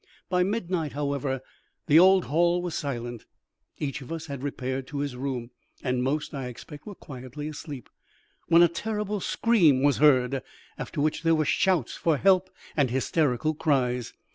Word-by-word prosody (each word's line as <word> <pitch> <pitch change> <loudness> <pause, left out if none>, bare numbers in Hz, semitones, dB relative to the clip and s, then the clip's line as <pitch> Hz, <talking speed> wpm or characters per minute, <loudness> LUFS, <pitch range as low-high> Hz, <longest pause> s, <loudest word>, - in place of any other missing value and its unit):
By 180 0 +2
midnight, 180 -6 -1
however, 140 -2 -2 0.4
the 150 +3 +6
old 190 +1 +6
hall 175 +3 +2
was 175 -2 -3
silent; 120 -5 -4 0.5
each 140 -2 -3
of 130 - -10
us 165 -1 -4
had 140 -4 -6
repaired 130 -1 -3
to 145 - -6
his 140 -2 -2
room, 125 -2 -4 0.3
and 125 -2 0
most, 145 +5 -1
I 135 -3 -4
expect, 145 - -10
were 205 - -7
quietly 135 0 -8
asleep, 150 -4 -7 0.6
when 170 +1 +7
a - - +7
terrible 210 +4 -3
scream 175 - +3
was 145 -1 +4
heard, 135 -3 +4 0.3
after - - -6
which 155 +1 0
there 165 0 +3
were 155 -1 +1
shouts 180 -8 +1
for 160 -3 +1
help 185 +2 +3 0.3
and 140 -4 +2
hysterical 135 +3 +1
cries. 125 -6 0
145 Hz, 165 wpm, -27 LUFS, 130-170 Hz, 0.6 s, when